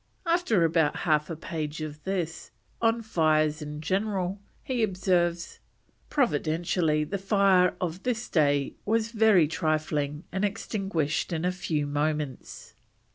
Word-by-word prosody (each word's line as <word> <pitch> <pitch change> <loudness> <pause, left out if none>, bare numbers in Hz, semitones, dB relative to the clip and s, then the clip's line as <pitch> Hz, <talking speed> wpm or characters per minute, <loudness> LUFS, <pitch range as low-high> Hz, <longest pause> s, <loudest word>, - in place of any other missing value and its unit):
After 335 - +2
about 160 -2 +2
half 150 -2 +2
a 165 - -3
page 155 -1 -5
of 150 -1 -6
this, 180 -4 -3 0.3
on 230 0 +2
fires 155 -6 +2
in 150 0 -6
general, 195 +1 -1 0.2
he 255 -3 -1
observes: 180 -4 0 0.5
"Providentially 160 - +1
the 195 +6 -3
fire 195 -2 +3
of 180 0 -3
this 245 0 -2
day 145 -4 +2
was 225 +1 0
very 215 -8 +5
trifling 155 -1 -1
and 190 +2 -2
extinguished 195 -6 -1
in 165 0 -1
a 180 - +2
few 175 -5 -2
moments." 145 -1 -3
170 Hz, 130 wpm, -27 LUFS, 155-195 Hz, 0.5 s, very